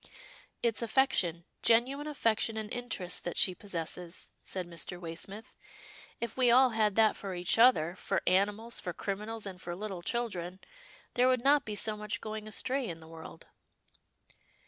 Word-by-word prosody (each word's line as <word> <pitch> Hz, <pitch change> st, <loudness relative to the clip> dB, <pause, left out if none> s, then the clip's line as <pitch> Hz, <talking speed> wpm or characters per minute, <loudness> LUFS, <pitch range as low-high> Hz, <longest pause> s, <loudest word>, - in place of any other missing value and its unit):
" -, -, -24 dB
It's 230 Hz, -1 st, +3 dB
affection 205 Hz, -9 st, +1 dB
— -, -, -48 dB
genuine 260 Hz, +6 st, +3 dB
affection 225 Hz, -6 st, 0 dB
and 215 Hz, -1 st, -4 dB
interest 210 Hz, -8 st, -3 dB
that 175 Hz, -, -4 dB
she 185 Hz, -, +4 dB
possesses," 175 Hz, -2 st, -6 dB
said 185 Hz, -2 st, -2 dB
Mr. 175 Hz, +1 st, -6 dB
Waysmith. 180 Hz, +5 st, -7 dB, 0.3 s
" -, -, -19 dB
If 235 Hz, -1 st, -4 dB
we 255 Hz, -2 st, +4 dB
all 255 Hz, +1 st, +6 dB
had 215 Hz, -3 st, +2 dB
that 220 Hz, -1 st, +5 dB
for 195 Hz, -2 st, -5 dB
each 175 Hz, +5 st, +2 dB
other, 185 Hz, -9 st, +5 dB
for -, -, -1 dB
animals, 210 Hz, +5 st, +1 dB
for 175 Hz, -, -4 dB
criminals, 210 Hz, +4 st, -4 dB
and 185 Hz, -2 st, -7 dB
for 175 Hz, 0 st, -5 dB
little 195 Hz, -2 st, -5 dB
children, 185 Hz, -5 st, -2 dB, 0.5 s
there 250 Hz, +1 st, +4 dB
would 255 Hz, -2 st, +2 dB
not 285 Hz, +1 st, +5 dB
be 210 Hz, -, -4 dB
so 215 Hz, +1 st, +1 dB
much 210 Hz, 0 st, -3 dB
going 215 Hz, 0 st, -6 dB
astray 255 Hz, +4 st, 0 dB
in 165 Hz, -1 st, -6 dB
the 160 Hz, -, -13 dB
world." 165 Hz, 0 st, -10 dB
210 Hz, 170 wpm, -31 LUFS, 180-235 Hz, 0.5 s, all